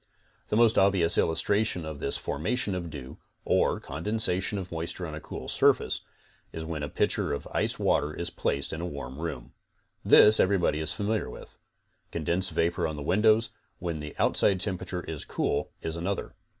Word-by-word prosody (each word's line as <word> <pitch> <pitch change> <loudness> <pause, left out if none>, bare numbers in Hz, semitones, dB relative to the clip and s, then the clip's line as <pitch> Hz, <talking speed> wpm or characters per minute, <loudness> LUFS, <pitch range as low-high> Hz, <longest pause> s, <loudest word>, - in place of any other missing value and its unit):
The 105 - 0
most 115 -1 +5
obvious 95 -4 +4
illustration 90 +2 +1
of 80 -2 -6
this 70 - -1
formation 100 - -1
of 90 -2 -4
dew, 70 -4 -9 0.3
or - - +2
condensation 95 +5 -1
of 95 -2 -6
moisture 85 +2 -3
on 80 - -6
a 75 - -5
cool - - -7
surface, - - +2 0.5
is 80 0 -6
when 80 -2 -4
a 75 - -3
pitcher - - 0
of 70 - -5
ice - - 0
water 75 +1 +1
is 85 +2 -4
placed 70 0 -1
in 80 - -4
a - - -3
warm 70 -3 -7
room. 80 -7 -5 0.5
This 105 +1 +8
everybody 95 -5 +2
is 80 -1 -1
familiar 105 +5 -1
with. - - -11 0.6
Condensed 85 +3 -1
vapor 85 +1 0
on 80 - -4
the 75 - -6
windows, 110 +6 +3 0.3
when 85 -3 -4
the 75 0 -7
outside 95 -2 +3
tem 95 -2 -1
perature 90 -1 -5
is 80 -3 -5
cool, - - -1
is 80 - -3
another. 95 +4 -3
85 Hz, 175 wpm, -28 LUFS, 75-100 Hz, 0.6 s, This